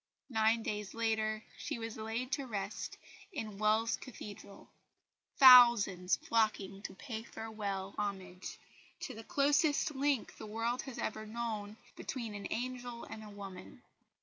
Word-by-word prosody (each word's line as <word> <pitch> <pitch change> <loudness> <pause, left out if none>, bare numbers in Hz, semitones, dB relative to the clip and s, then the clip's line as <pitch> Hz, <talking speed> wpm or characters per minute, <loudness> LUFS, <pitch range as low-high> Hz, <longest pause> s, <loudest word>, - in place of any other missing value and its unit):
Nine 220 0 +3
days 210 -2 -3
later 220 -1 0 0.2
she - - -3
was 225 -1 -5
laid 225 +4 -3
to 270 0 -1
rest 200 -3 -4 0.3
in 215 - -5
Wells 215 +2 +3
Cathedral, 205 -5 -10 0.7
thousands 235 -8 +8
flocking 210 -4 0
to 200 - -7
pay 220 +1 -5
farewell 205 -4 -5
homage 190 -3 -4 0.4
to - - -4
the 225 - -9
closest 290 +4 +2
link 275 -2 0
the 215 - -8
world 230 +3 -1
has 255 - -8
ever 215 0 -3
known 215 -2 -4 0.2
"between 230 -5 -4
an 205 -1 -5
angel 245 -1 -4
and 220 -1 -8
a 210 - -9
woman." 200 +2 -9
220 Hz, 135 wpm, -34 LUFS, 205-235 Hz, 0.7 s, thousands